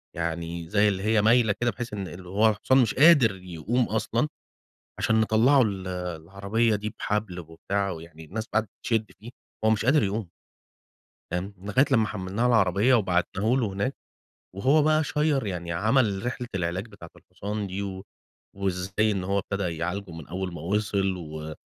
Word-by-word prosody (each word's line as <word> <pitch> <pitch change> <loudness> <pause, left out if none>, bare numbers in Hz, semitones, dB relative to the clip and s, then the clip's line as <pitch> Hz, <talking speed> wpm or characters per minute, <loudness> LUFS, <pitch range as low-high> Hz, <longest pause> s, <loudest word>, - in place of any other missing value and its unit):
يعني 85 0 -4
زي 105 +2 +3
اللي 95 -1 -1
هي 110 -1 +3
مايلة 110 -1 +4
كده 120 -1 +2
بحيث 120 -3 -6
إن 95 -2 -6
هو 105 +5 +3
الحصان 120 +5 +2
مش 120 -5 +3
قادر 140 - +6
يقوم 95 +7 -2
أصلًا 115 +5 0 0.7
عشان 110 0 +2
نطَّلعُه 120 +6 +4
ال 95 -4 -1
العربية 95 +6 -1
دي 105 +1 -5
بحبل 105 -4 -2
وبتاع، 95 +5 -3
ويعني 80 -1 -10
الناس 110 +7 -5
قعدت 110 -2 +1 0.2
تشد 110 -2 0
فيه، 115 - -10 0.4
هو - - +5
مش 110 0 +1
قادر 135 0 +4
يقوم. 100 -1 -2 1.0
تمام، 95 +3 -3
لغاية 105 +8 +2
لمّا 115 -5 +3
حمّلناه 95 +3 -3
على 125 - +4
العربية 105 +4 +4
وبعتناه 95 0 +1
لُه 125 - +1
هناك 105 +8 -2 0.6
وهو 135 +10 +3
بقى 155 0 +3
شير 150 -4 0
يعني 85 -3 -4
عمل 110 +2 +1
رحلة 125 0 -3
العلاج 90 +4 -2
بتاعة 95 -6 -12
الحصان 100 +3 -5
دي 95 +2 -4
و 95 -1 -6 0.5
وإزاي 100 +2 0
إن 95 -2 -2
هو 100 +2 0
ابتدى 95 -5 -3
يعالجه 90 +2 -3
من 80 -3 -9
أول 90 +1 -4
ما 80 - -7
وصل 100 0 0
و 80 -2 -7
100 Hz, 165 wpm, -26 LUFS, 90-110 Hz, 1.0 s, قادر